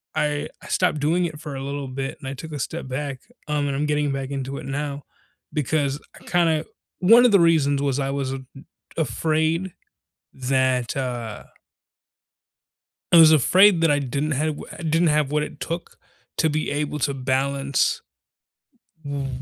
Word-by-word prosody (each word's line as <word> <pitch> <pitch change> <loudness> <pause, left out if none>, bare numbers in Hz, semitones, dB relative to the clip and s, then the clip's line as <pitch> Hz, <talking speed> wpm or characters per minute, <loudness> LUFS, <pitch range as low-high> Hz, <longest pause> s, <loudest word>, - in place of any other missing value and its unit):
I 150 -1 0
I - - -12
stopped 150 - +1
doing 165 +5 +1
it 155 -3 -5
for 150 -3 -7
a 135 - -5
little 140 0 -4
bit, 135 +1 -4
and 135 - -8
I 135 - -3
took 155 +4 -8
a 145 - -4
step 160 +1 -4
back, 135 0 -4 0.3
um, 150 -1 0
and 140 - -1
I'm 145 +2 0
getting 150 -1 0
back 135 -1 -3
into 135 0 -4
it - - -7
now 140 +1 -4 0.5
because 145 -1 0 0.2
I - - -19
kinda 165 -3 +2 0.3
1 230 +7 +7
of 245 - +5
the 200 - +6
reasons 150 -5 +3
was 140 -2 0
I 135 - -1
was 135 -1 -2
a - - -3 0.2
m 135 - -13 0.3
afraid 160 +2 0 0.6
that, 130 -1 0
uh 120 -5 -4 1.7
I 170 - +8
was 160 -1 +9
afraid 185 +6 +6
that 165 - +4
I 145 - +3
didn't 140 +3 -2
have 150 +2 -1
wha - - -8
didn't 165 +1 +2
have 150 -2 +2
what 150 - +1
it 150 - -8
took 170 +2 -5 0.4
to 160 - +3
be 155 +1 -1
able 150 0 -2
to 140 +1 0
balance 135 +1 0 1.0
w 140 -1 -3
145 Hz, 175 wpm, -23 LUFS, 135-155 Hz, 1.7 s, was